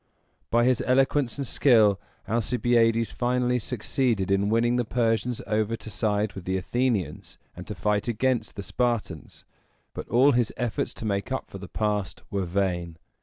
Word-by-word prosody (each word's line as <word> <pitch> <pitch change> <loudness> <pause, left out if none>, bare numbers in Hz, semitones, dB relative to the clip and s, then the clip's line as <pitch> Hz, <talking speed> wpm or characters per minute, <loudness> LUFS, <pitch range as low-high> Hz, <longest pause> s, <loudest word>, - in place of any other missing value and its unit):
By 120 +1 +3
his 125 -2 +2
eloquence 135 0 +2
and 140 - -3
skill, 110 -7 +4 0.3
Alcibiades 115 0 +2
finally 125 0 0
succeeded 115 -3 -1
in 100 +1 +2
winning 120 +2 +2
the 125 - +1
Persians 115 0 0
over 110 +1 0
to 110 - -9
side 105 -1 0
with 95 -2 -9
the 95 0 0
Athenians, 105 - -2 0.2
and 90 - -9
to 105 - -5
fight 105 +3 0
against 120 0 0
the 100 - -5
Spartans; 110 - -3 0.5
but - - -7
all 130 +4 +5
his 120 -3 +1
efforts 120 -3 -2
to - - -7
make 100 +2 -2
up 130 - -4
for 95 - -8
the 95 - -8
past 105 -1 -2
were 100 -3 -1
vain. 90 -3 -1
110 Hz, 165 wpm, -26 LUFS, 100-125 Hz, 0.5 s, all